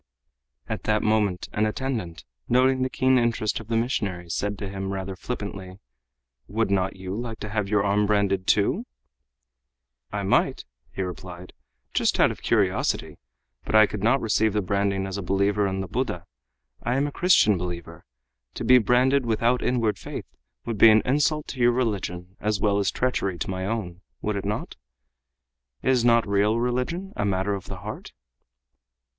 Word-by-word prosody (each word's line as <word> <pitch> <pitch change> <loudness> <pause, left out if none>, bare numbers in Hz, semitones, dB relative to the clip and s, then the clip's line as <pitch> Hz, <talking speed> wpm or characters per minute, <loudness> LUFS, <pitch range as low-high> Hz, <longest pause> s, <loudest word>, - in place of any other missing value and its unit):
At - - -4
that 105 0 +1
moment 105 -4 +1
an 105 +1 +1
attendant, 110 -9 -4 0.2
noting 130 +1 +3
the 130 - +1
keen 130 0 +3
interest 115 -3 0
of 110 - -11
the 115 0 0
missionary, 95 -8 -2
said 100 +3 -2
to 100 - -5
him 95 0 -4
rather 95 0 -4
flippantly, 100 -3 -6 0.7
"Would 110 0 -1
you - - +4
not 95 0 -1
like 110 +5 -5
to 105 - -5
have 105 -1 -2
your 105 -1 +2
arm 105 +1 +2
branded, 100 -2 +1
too?" 165 - +2 1.2
"I - - -3
might," - - +1 0.3
he 95 - -3
replied, 90 0 -8 0.4
"just - - +1
out - - +5
of - - -9
curiosity, - - 0 0.4
but - - -2
I 110 0 +8
could 105 -1 -6
not 115 +6 +3
receive 110 -1 +2
the 105 -1 0
branding 100 0 0
as 95 +1 -4
a - - -3
believer 100 +2 +1
in 95 0 -2
the 95 - -5
Buddha. 90 -5 -3 0.6
I 120 - -1
am 140 - +2
a 145 - -3
Christian 170 - +4
believer. 90 -1 -6 0.5
To - - -4
be 125 0 +7
branded 125 +3 +3
without 115 +2 +2
inward 115 -5 0
faith - - -6 0.4
would 115 -3 -3
be 115 - +9
an 110 0 +5
insult 150 +3 +1
to 130 - -7
your 120 0 +4
religion 95 -6 -3
as 105 -1 -1
well 100 0 +2
as 100 -2 +1
treachery 100 -8 -1
to 95 - -3
my 95 0 -3
own, 95 -5 -4 0.2
would 105 0 -1
it 100 - -3
not? 105 +1 -3 1.1
Is 130 -3 +3
not 115 -2 +4
real 100 +3 +2
religion 125 +11 -2
a - - -1
matter 100 0 0
of 100 -1 -5
the 95 -2 -8
heart?" 105 +2 -8
105 Hz, 175 wpm, -25 LUFS, 95-120 Hz, 1.2 s, be